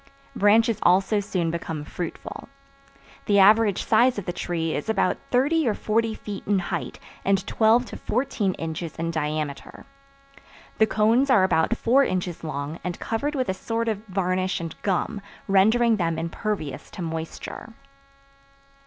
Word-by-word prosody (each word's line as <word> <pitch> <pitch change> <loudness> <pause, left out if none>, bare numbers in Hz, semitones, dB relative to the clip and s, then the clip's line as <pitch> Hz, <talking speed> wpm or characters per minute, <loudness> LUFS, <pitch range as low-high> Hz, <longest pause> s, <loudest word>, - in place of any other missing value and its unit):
Branches 220 +2 +4
also 195 +4 +3
soon 180 -4 -1
become 160 -2 -4
fruitful. 170 - -7 0.8
The 205 - +4
average 210 0 +5
size 240 +2 +4
of 205 - -4
the 175 - -3
tree 165 -2 -2
is 145 - -4
about 195 -4 +1
thirty 285 +4 +2
or 215 - +1
forty 225 +1 0
feet 205 -2 -7
in 205 0 +3
height 180 - -3 0.3
and 195 -1 +1
twelve 225 +4 +3
to - - -8
fourteen 225 -6 -1
inches 165 0 -5
in 165 0 -2
diameter. 150 -2 -4 0.9
The 220 - +5
cones 225 +6 +3
are 220 -7 +5
about 190 +5 +2
four 265 +4 +4
inches 180 -7 -2
long 150 +1 -4
and 180 -1 -4
covered 285 +7 -2
with 255 -2 -1
a - - +1
sort 230 +4 -3
of 215 -2 -2
varnish 185 -1 -1
and 165 -1 -6
gum, 200 +1 -1 0.3
rendering 220 +4 +4
them 165 -3 -1
impervious 165 - -4
to 180 - -7
moisture. 165 +6 -6
195 Hz, 150 wpm, -24 LUFS, 170-225 Hz, 0.9 s, average